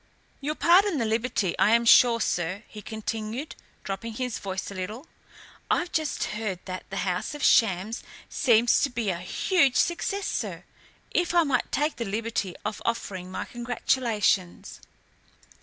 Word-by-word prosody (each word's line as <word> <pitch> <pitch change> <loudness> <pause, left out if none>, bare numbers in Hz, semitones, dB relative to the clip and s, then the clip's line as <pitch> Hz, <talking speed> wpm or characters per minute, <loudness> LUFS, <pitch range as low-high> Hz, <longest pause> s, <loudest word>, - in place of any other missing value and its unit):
"You'll 295 +2 -3
pardon 365 +2 +4
the 235 - 0
liberty, 220 -4 0
I 215 +3 +5
am 235 0 +2
sure, 235 0 +7
sir," 180 0 -1
he 210 - -10
continued, 220 +5 -5 0.3
dropping 220 +4 -5
his 250 +1 -3
voice 190 0 -4
a - - -6
little. 205 - -6 0.6
"I've 345 0 +1
just 315 -2 -1
heard 210 -3 -3
that 185 -1 -7
'The 195 - -5
House 180 +9 -2
of 295 - -6
Shams' 215 0 +3 0.3
seems 235 -2 +3
to 280 - +2
be 230 -5 -1
a 170 - -4
huge 275 - +2
success, 390 +3 0
sir. - - -3 0.5
If 350 0 0
I 340 - +6
might 270 -5 0
take 300 +2 0
the 235 - -3
liberty 210 -2 -2
of 210 0 -3
offering 190 -5 -3
my 185 - -4
congratulations!" 235 -6 -1
230 Hz, 155 wpm, -26 LUFS, 195-265 Hz, 0.6 s, sure